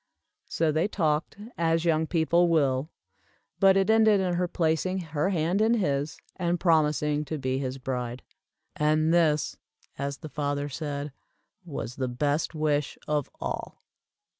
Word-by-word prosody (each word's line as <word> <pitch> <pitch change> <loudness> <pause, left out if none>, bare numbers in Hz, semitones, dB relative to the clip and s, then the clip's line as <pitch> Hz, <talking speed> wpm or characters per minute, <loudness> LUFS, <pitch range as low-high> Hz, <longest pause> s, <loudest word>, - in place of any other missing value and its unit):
So 160 -1 +1
they 155 +5 +1
talked, 155 -6 -1 0.2
as 165 0 +1
young 160 -1 +2
people 170 +1 +3
will, 140 -3 +2 0.7
but 195 -1 +6
it 195 - +2
ended 220 -2 +5
in 185 -2 0
her 180 +1 0
placing 170 +2 0 0.2
her 150 +4 +1
hand 175 +2 +1
in 225 +2 +4
his, 145 -7 -1 0.2
and 175 -1 0
promising 150 -3 +2
to 155 +2 -4
be 130 -1 -1
his 130 -1 -3
bride. 125 -2 -4 0.5
"And 155 +2 +2
this," 155 -3 +2 0.4
as 140 0 -3
the 155 - -9
father 145 -1 -2
said, 145 0 -4 0.5
"was 130 -7 -6
the 130 -1 -1
best 145 +6 -1
wish 150 -2 0
of 150 -2 0
all." - - -5
155 Hz, 145 wpm, -27 LUFS, 145-170 Hz, 0.7 s, but